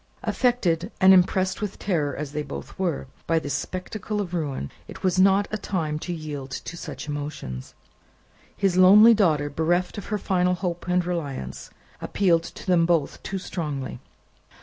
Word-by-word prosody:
Affected, 205 -7 +1
and 190 0 +8
impressed 185 +1 +3
with 210 -2 -3
terror 155 -8 -1
as 145 -1 -5
they 150 +1 -2
both 145 +4 -8
were, 175 -8 -1 0.2
by 165 - +3
this 145 -4 -2
spectacle 185 +7 -4
of 185 -4 -3
ruin, 140 - -3 0.2
it - - -11
was 185 0 +2
not 195 +1 +5
a 215 - -2
time 160 -7 -2
to 175 - -5
yield 150 -5 -5
to 150 +6 -6
such 170 - -7
emotions. 145 - -6 0.8
His 195 -3 +1
lonely 205 +5 +8
daughter, 160 -9 +2
bereft 175 +7 0
of - - -9
her 210 - -1
final 180 -2 +1
hope 175 -2 -4
and 180 0 +2
reliance, 145 - -4 0.3
appealed 175 -5 +2
to - - -10
them 175 -3 +3
both 165 -5 +1
too 195 - -4
strongly. 150 -8 -4
175 Hz, 165 wpm, -25 LUFS, 150-190 Hz, 0.8 s, and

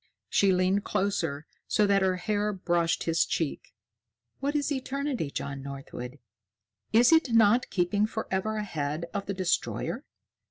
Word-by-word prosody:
She 200 -1 +4
leaned 185 +2 +2
closer 170 -7 -1 0.2
so 210 - +3
that 200 -1 +3
her 190 -1 +2
hair 210 +2 -1
brushed 175 -3 0
his 165 0 +2
cheek. 160 -4 -3 0.6
"What 285 +2 -1
is 295 0 0
eternity, 270 - -2
John 140 -1 -5
Northwood? 135 -1 -7 0.7
Is 240 +5 +6
it 320 -7 +4
not 230 +2 +5
keeping 200 +3 +1
forever 215 -1 -2
ahead 155 -6 -3
of 200 - -3
the 200 - -2
Destroyer? 185 -2 -1
195 Hz, 135 wpm, -28 LUFS, 165-220 Hz, 0.7 s, Is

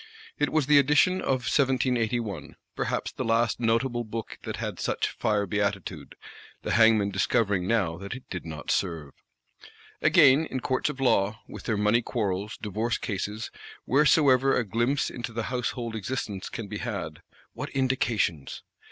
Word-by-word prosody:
It 145 - +2
was 155 -3 +2
the 145 +1 +6
edition 150 +7 +3
of 130 -2 -1
1781; 120 - 0 0.2
perhaps - - -2
the - - -4
last 115 -1 +1
notable 120 +1 +1
book 115 0 -6
that - - -3
had - - -5
such - - -1
fire 105 -1 0
beatitude,—the 100 -1 -5
hangman 110 -3 +4
discovering 100 -5 +1
now 95 -8 +1
that 100 +4 -6
it 130 - -11
did 90 - -4
not 80 -3 -5
serve. 80 -6 -1 0.9
Again, 140 +4 +6
in 130 - -3
Courts 130 +3 0
of 140 -3 -6
Law, 110 -4 +2
with - - -10
their 110 -3 0
money 105 +3 +3
quarrels, 105 -3 -2
divorce 110 +3 -1
cases, 105 +1 -4 0.3
wheresoever 135 -1 +4
a 125 - +1
glimpse 120 +6 0
into 120 -1 -6
the 115 0 -2
household 120 -2 -2
existence 105 -3 -4
can 115 -3 -6
be 105 0 -5
had, 95 -10 -5 0.3
what - - -5
indications! 115 - -1
115 Hz, 150 wpm, -27 LUFS, 100-130 Hz, 0.9 s, the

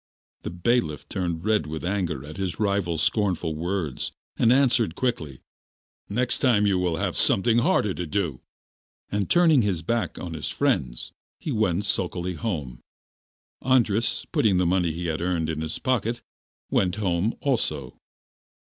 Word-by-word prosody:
The - - -4
bailiff 90 - 0
turned 85 -2 -3
red 105 -8 +2
with 80 +2 -5
anger 90 -8 -2
at 75 +3 -9
his 95 -3 -3
rival's 100 -7 0
scornful 90 -6 +1
words, 85 -3 -3 0.2
and 115 - +4
answered 125 -8 +3
quickly: 80 - -2 0.7
'Next 120 +4 0
time 115 -6 +3
you 95 -2 +2
will 90 -2 0
have 95 +1 -2
something 115 +4 +3
harder 105 -4 +2
to 90 -1 -4
do.' 75 -6 -2 0.7
And 100 -1 -1
turning 165 -6 +5
his 95 -6 -1
back 115 +5 -1
on 85 -2 -6
his 80 - -4
friends, - - -1 0.3
he 155 - -4
went 105 -4 +1
sulkily 90 -2 0
home. 75 - -4 0.8
Andras, 120 -4 +2
putting 100 -5 +3
the 90 - +2
money 90 -1 +2
he 85 +2 -5
had 80 -1 -2
earned 85 -2 0
in 80 -1 -4
his 80 0 -3
pocket, 120 -3 -1 0.5
went 90 -1 +2
home 100 +1 0
also. 75 - -1
90 Hz, 150 wpm, -25 LUFS, 80-110 Hz, 0.8 s, turning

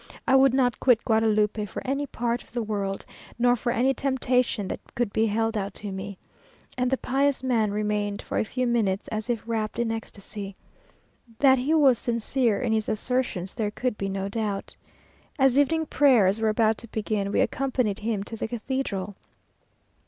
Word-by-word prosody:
I 265 - +5
would 265 -1 +5
not 250 -4 +2
quit 245 -3 +3
Guadalupe 215 -2 +2
for - - -7
any 275 +2 -1
other - - -18
part 240 0 -1
of - - -20
the 240 -1 -1
world, 200 -2 -3 0.3
nor 245 +1 +4
for 240 +1 -2
any 250 +3 +2
temptation 250 -5 0
that - - -4 0.2
could 240 -4 -1
be 220 +1 +2
held 225 +2 0
out 200 -2 -3
to 205 -1 -6
me;" 190 +1 -6 0.6
and 250 0 0
the 265 - +1
pious 275 +1 0
man 230 -5 +2
remained 210 0 -1
for - - -2
a - - +2
few 255 +3 -2
minutes 220 -5 0
as 220 +1 -4
if 235 -3 -1
wrapt 220 -2 -2
in 235 -1 0
ecstasy. 205 -2 -6 0.8
That 265 0 +5
he 290 +6 +1
was 275 -6 +5
sincere 235 -1 0
in 235 -3 0
his 220 -1 0
assertions, 215 -5 -1
there 215 -2 -1
could 245 +3 -2
be 195 -1 -3
no 195 0 -2
doubt. 205 -1 -3 0.6
As 270 -2 +4
evening 320 +3 +2
prayers 230 -10 +4
were 220 - +3
about 220 0 +2
to 235 - -7
begin, 210 -2 -2
we - - +1
accompanied 250 -6 0
him 215 -2 -2
to 225 - -8
the 225 - -3
cathedral. 220 -5 -3
225 Hz, 185 wpm, -26 LUFS, 210-255 Hz, 0.8 s, I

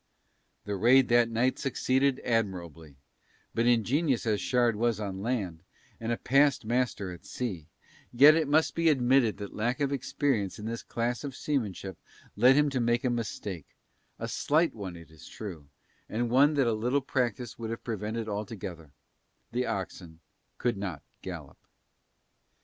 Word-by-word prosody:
The 100 - -2
raid 125 +6 +5
that 120 -1 +4
night 120 +3 +1
succeeded 135 0 +1
admirably, 85 - -2 0.6
but 115 +1 +1
ingenious 120 +4 +2
as 105 -2 +1
Shard 120 -3 +2
was 115 0 0
on 95 -2 -4
land, 100 -8 -2 0.4
and 115 +1 -3
a 115 - 0
past 140 -2 +3
master 115 -5 -1
at 85 - -10
sea, 95 -12 -5 0.4
yet 140 +5 +8
it 160 -2 +1
must 155 +2 +3
be 165 -1 +3
admitted 130 -4 +3
that 100 -1 -7
lack 120 +6 -1
of 140 -1 0
experience 130 -7 -1
in 105 - -8
this 115 +1 -4
class 120 +2 -2
of 140 -3 -5
seamanship 100 - -3 0.4
led 125 +5 +6
him 150 0 +3
to 130 - 0
make 120 0 +1
a 125 - +1
mistake, 105 - -5 0.4
a - - -4
slight 155 0 +1
one 95 -5 -6
it 85 -2 -14
is 80 -2 -14
true, 85 -9 -8 0.4
and 115 +2 -1
one 145 +4 +5
that 140 -2 +3
a 115 - +2
little 125 +6 0
practice 120 -5 -2
would 115 -1 -4
have 115 - -5
prevented 110 0 -3
altogether: 100 -6 -5 0.6
the 125 +2 -1
oxen 90 -4 -5 0.4
could 120 -4 0
not 95 -6 -5 0.2
gallop. - - -8
115 Hz, 160 wpm, -29 LUFS, 100-130 Hz, 0.6 s, yet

